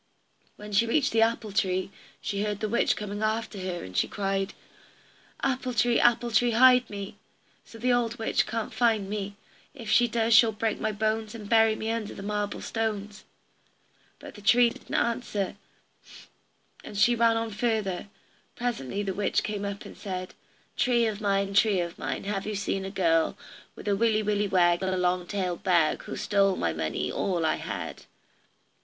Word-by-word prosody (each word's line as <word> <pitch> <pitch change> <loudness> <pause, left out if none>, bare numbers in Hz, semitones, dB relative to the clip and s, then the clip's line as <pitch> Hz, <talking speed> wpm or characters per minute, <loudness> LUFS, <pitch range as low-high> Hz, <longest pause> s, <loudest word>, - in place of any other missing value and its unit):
When 210 0 -10
she 220 +3 +3
reached 280 +4 +2
the 225 - +3
apple 225 -2 +1
tree, 190 -2 0 0.3
she 200 -1 -2
heard 210 -1 -2
the 215 - -1
witch 235 +3 +2
coming 205 0 -5
after 220 -1 -1
her, 185 -2 -4
and 95 0 -10
she - - +2
cried: 195 -1 -2 0.9
"Apple 255 -2 -1
tree, 235 +1 +3
apple 240 0 +3
tree, 240 +2 +3
hide 250 +1 +6
me, 200 -1 -7 0.5
So 230 - -13
the 245 +2 +1
old 240 -1 0
witch 225 - 0
can't 225 0 -3
find 225 -5 +2
me; 200 0 -4 0.4
If 230 -5 -6
she 240 0 +5
does 230 0 +1
she'll 220 0 +6
break 215 +1 -1
my 215 - -1
bones, 215 +1 -1
And 210 -3 -8
bury 225 0 +4
me 220 +1 -3
under 225 -2 -4
the 195 - -8
marble 205 0 -2
stones." 210 -2 -3 0.9
But - - -11
the 205 - -12
tree 235 +3 +5
didn't - - -8
answer, 230 -5 -1 1.3
and 205 - -8
she 240 +4 +5
ran 230 -1 +3
on 225 0 -2
further. 210 -4 -1 0.5
Presently 205 - -3
the 195 -1 -2
witch 205 +1 0
came 210 -1 -3
up 200 0 -5
and - - -10
said: 185 -2 -6 0.4
"Tree 240 -2 +2
of 215 -1 -2
mine, 200 -1 0
tree 200 -1 +4
of 170 0 -4
mine, - - -3
Have 200 0 -3
you 215 - -2
seen 195 -1 -2
a - - -4
girl, 165 -4 +1 0.4
With - - -10
a 200 - +3
willy 220 0 +2
willy 210 0 +1
wag, 175 -2 +3
and 190 0 0
a - - -2
long 180 0 0
tailed 185 -3 -2
bag, 170 -4 +2
Who's - - -5
stole 200 -2 +2
my 85 - -1
money, 80 -2 -2
all 175 -4 -1
I 160 - +1
had?" - - -6
210 Hz, 185 wpm, -27 LUFS, 195-225 Hz, 1.3 s, hide